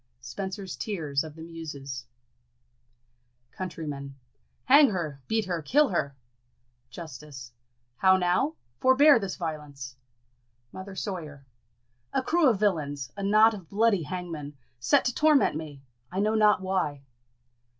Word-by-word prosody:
Spencer's 190 Hz, -, -6 dB
Tears 155 Hz, -9 st, -2 dB
of 155 Hz, -1 st, -10 dB
the 160 Hz, -, -9 dB
Muses. 140 Hz, -6 st, -7 dB, 1.4 s
Countrymen. 145 Hz, -6 st, -6 dB, 0.5 s
Hang 280 Hz, +1 st, +7 dB
her! 160 Hz, -8 st, -4 dB
beat 220 Hz, -1 st, 0 dB
her! 175 Hz, -3 st, -2 dB
kill 290 Hz, -, +3 dB
her! 140 Hz, -7 st, -1 dB, 0.7 s
Justice. 140 Hz, -4 st, -10 dB, 0.5 s
How 190 Hz, 0 st, +5 dB
now? 185 Hz, -, +1 dB, 0.2 s
Forbear 265 Hz, +1 st, +6 dB
this 195 Hz, -3 st, -4 dB
violence! 150 Hz, -6 st, -6 dB, 0.8 s
Mother 190 Hz, +1 st, -9 dB
Sawyer. 155 Hz, -9 st, -6 dB, 0.7 s
A 265 Hz, -, +1 dB
crew 330 Hz, -2 st, +3 dB
of 220 Hz, -5 st, 0 dB
villains 150 Hz, -9 st, -1 dB
a 200 Hz, -, -6 dB
knot 215 Hz, +3 st, +5 dB
of 190 Hz, -6 st, -10 dB
bloody 210 Hz, -2 st, +2 dB
hangmen! 160 Hz, -4 st, -6 dB, 0.2 s
set 120 Hz, -, +3 dB
to 250 Hz, -, +1 dB
torment 300 Hz, -, +3 dB
me! 150 Hz, -3 st, -7 dB, 0.3 s
I 190 Hz, -, -3 dB
know 210 Hz, +2 st, +2 dB
not 210 Hz, -2 st, +4 dB
why. 180 Hz, -7 st, -1 dB
175 Hz, 125 wpm, -27 LUFS, 145-210 Hz, 1.4 s, Hang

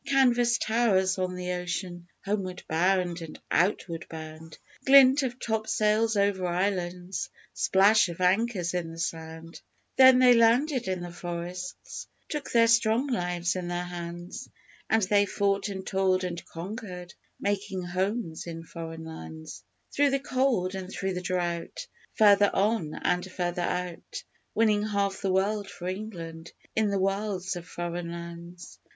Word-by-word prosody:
Canvas 245 Hz, -3 st, +4 dB
towers 195 Hz, -5 st, +2 dB
on 185 Hz, 0 st, -1 dB
the 180 Hz, 0 st, -3 dB
ocean 175 Hz, 0 st, -4 dB, 0.2 s
homeward 190 Hz, -3 st, -2 dB
bound 180 Hz, +1 st, +1 dB
and 160 Hz, -2 st, -8 dB
outward 175 Hz, -2 st, +1 dB
bound 160 Hz, 0 st, -9 dB, 0.3 s
Glint 270 Hz, 0 st, +7 dB
of 255 Hz, -2 st, -3 dB
topsails 220 Hz, 0 st, +1 dB
over 200 Hz, -2 st, +1 dB
islands 180 Hz, 0 st, -2 dB, 0.2 s
splash 200 Hz, +1 st, +4 dB
of 170 Hz, -, -7 dB
anchors 185 Hz, -1 st, +1 dB
in 175 Hz, -2 st, -2 dB
the 165 Hz, -, -9 dB
sound; 165 Hz, 0 st, -5 dB, 0.4 s
Then 260 Hz, -1 st, +9 dB
they 255 Hz, -1 st, +7 dB
landed 245 Hz, +3 st, +3 dB
in 185 Hz, -1 st, -2 dB
the 175 Hz, 0 st, -6 dB
forests, 175 Hz, +1 st, -6 dB, 0.2 s
took 300 Hz, -2 st, -4 dB
their 230 Hz, -2 st, +5 dB
strong 230 Hz, +4 st, +3 dB
lives 175 Hz, -6 st, -1 dB
in 180 Hz, -1 st, -3 dB
their 175 Hz, 0 st, -2 dB
hands, 175 Hz, 0 st, -7 dB, 0.4 s
And 220 Hz, -1 st, +3 dB
they 205 Hz, +1 st, +3 dB
fought 200 Hz, +1 st, 0 dB
and 190 Hz, -1 st, -6 dB
toiled 190 Hz, -1 st, +1 dB
and 175 Hz, -1 st, -4 dB
conquered 180 Hz, -1 st, -7 dB, 0.3 s
making 195 Hz, -2 st, -2 dB
homes 185 Hz, -1 st, -2 dB
in 165 Hz, -1 st, -6 dB
Foreign 165 Hz, -1 st, -8 dB
Lands, 160 Hz, 0 st, -9 dB, 0.3 s
Through 285 Hz, 0 st, +3 dB
the 275 Hz, 0 st, +1 dB
cold 255 Hz, -9 st, 0 dB
and 190 Hz, -1 st, -5 dB
through 190 Hz, -1 st, -2 dB
the 180 Hz, -, -3 dB
drought 175 Hz, -2 st, -2 dB, 0.3 s
Further 205 Hz, -1 st, +6 dB
on 195 Hz, -6 st, +1 dB
and 180 Hz, +1 st, -1 dB
further 175 Hz, -1 st, -2 dB
out 180 Hz, 0 st, -4 dB, 0.3 s
Winning 215 Hz, -2 st, +3 dB
half 200 Hz, -2 st, -1 dB
the 195 Hz, -, 0 dB
world 200 Hz, +2 st, 0 dB
for 180 Hz, -2 st, -7 dB
England 175 Hz, -4 st, -6 dB, 0.2 s
in 220 Hz, -1 st, +2 dB
the 200 Hz, -, 0 dB
wilds 195 Hz, -1 st, -1 dB
of 175 Hz, 0 st, -8 dB
Foreign 175 Hz, 0 st, -4 dB
Lands. 170 Hz, +1 st, -9 dB
185 Hz, 145 wpm, -28 LUFS, 175-215 Hz, 0.4 s, Then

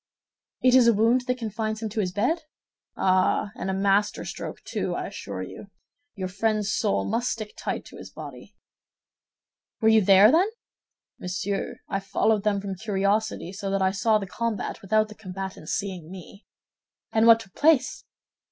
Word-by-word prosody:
"It 255 Hz, -1 st, +5 dB
is 255 Hz, -2 st, +7 dB
a 230 Hz, -, +5 dB
wound 235 Hz, +4 st, +3 dB
that 250 Hz, 0 st, 0 dB
confines 220 Hz, -1 st, -3 dB
him 220 Hz, -, -2 dB
to 215 Hz, +2 st, -4 dB
his 185 Hz, -3 st, 0 dB
bed?" 245 Hz, -, 0 dB, 0.6 s
"Ah, 185 Hz, +2 st, +2 dB
and 190 Hz, -, -4 dB
a -, -, 0 dB
master 200 Hz, +1 st, +1 dB
stroke, -, -, -7 dB
too, -, -, -3 dB
I -, -, -3 dB
assure -, -, -6 dB
you. -, -, -10 dB, 0.5 s
Your 190 Hz, -2 st, -3 dB
friend's 215 Hz, +2 st, 0 dB
soul 215 Hz, -3 st, 0 dB
must 235 Hz, +3 st, 0 dB
stick 215 Hz, -2 st, -5 dB
tight -, -, -4 dB
to -, -, -12 dB
his -, -, -10 dB
body." -, -, -11 dB, 1.2 s
"Were 220 Hz, -, +4 dB
you 220 Hz, 0 st, +6 dB
there, 195 Hz, +3 st, +7 dB
then?" 360 Hz, +7 st, +4 dB, 0.7 s
"Monsieur, 190 Hz, +2 st, -3 dB
I 195 Hz, -, -1 dB
followed 205 Hz, +2 st, +1 dB
them 205 Hz, -2 st, +1 dB
from 195 Hz, 0 st, -4 dB
curiosity, 200 Hz, -1 st, -1 dB
so 195 Hz, 0 st, -4 dB
that 195 Hz, 0 st, +1 dB
I 190 Hz, -, +3 dB
saw 215 Hz, +3 st, +2 dB
the 205 Hz, -, -4 dB
combat 225 Hz, +1 st, -3 dB
without 215 Hz, +2 st, +2 dB
the 215 Hz, -, -11 dB
combatants 190 Hz, -5 st, -6 dB
seeing 185 Hz, -5 st, -4 dB
me." 190 Hz, +2 st, -12 dB, 0.6 s
"And 225 Hz, +1 st, +3 dB
what 230 Hz, -1 st, +8 dB
took 195 Hz, -4 st, -13 dB
place?" 310 Hz, -1 st, +2 dB
210 Hz, 170 wpm, -25 LUFS, 195-225 Hz, 1.2 s, what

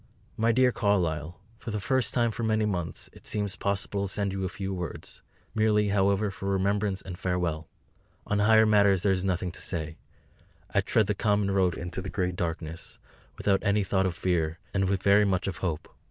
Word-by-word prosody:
MY 115 Hz, +1 st, +2 dB
DEAR 130 Hz, +1 st, +4 dB
CARLYLE, 90 Hz, -7 st, 0 dB, 0.2 s
For 125 Hz, -, -7 dB
the 105 Hz, -1 st, -2 dB
first 115 Hz, +5 st, +1 dB
time 120 Hz, -2 st, +1 dB
for 115 Hz, -, -6 dB
many 110 Hz, -1 st, +1 dB
months 90 Hz, -5 st, -3 dB
it -, -, -10 dB
seems 105 Hz, -2 st, 0 dB
possible 100 Hz, 0 st, -1 dB
to -, -, -7 dB
send 100 Hz, -2 st, -1 dB
you 95 Hz, -1 st, -3 dB
a 95 Hz, -, -1 dB
few 95 Hz, +1 st, -4 dB
words; 90 Hz, -4 st, -6 dB, 0.3 s
merely, 105 Hz, -1 st, +2 dB
however, 100 Hz, +1 st, +2 dB
for 95 Hz, 0 st, -5 dB
Remembrance 100 Hz, 0 st, 0 dB
and 90 Hz, -2 st, -8 dB
Farewell. 85 Hz, -4 st, -1 dB, 0.6 s
On 105 Hz, -, 0 dB
higher 110 Hz, +1 st, +6 dB
matters 100 Hz, -3 st, +4 dB
there 100 Hz, -, +3 dB
is 95 Hz, -1 st, 0 dB
nothing 90 Hz, -2 st, -1 dB
to -, -, -10 dB
say. 80 Hz, -2 st, -4 dB, 0.7 s
I 100 Hz, -, +3 dB
tread 110 Hz, +3 st, +2 dB
the 105 Hz, -, 0 dB
common 100 Hz, -1 st, +1 dB
road 95 Hz, -3 st, +2 dB
into 85 Hz, +2 st, -4 dB
the 95 Hz, -, -5 dB
great 90 Hz, -2 st, -1 dB
darkness, 85 Hz, -1 st, -5 dB, 0.4 s
without 100 Hz, -1 st, +1 dB
any 100 Hz, +1 st, +2 dB
thought 95 Hz, 0 st, +1 dB
of 90 Hz, -, -3 dB
fear, 85 Hz, -2 st, 0 dB, 0.2 s
and 95 Hz, -1 st, +1 dB
with 95 Hz, -1 st, -1 dB
very 100 Hz, +1 st, +5 dB
much 95 Hz, -2 st, +1 dB
of 95 Hz, -2 st, -3 dB
hope. 85 Hz, -5 st, -3 dB
95 Hz, 195 wpm, -28 LUFS, 90-105 Hz, 0.7 s, higher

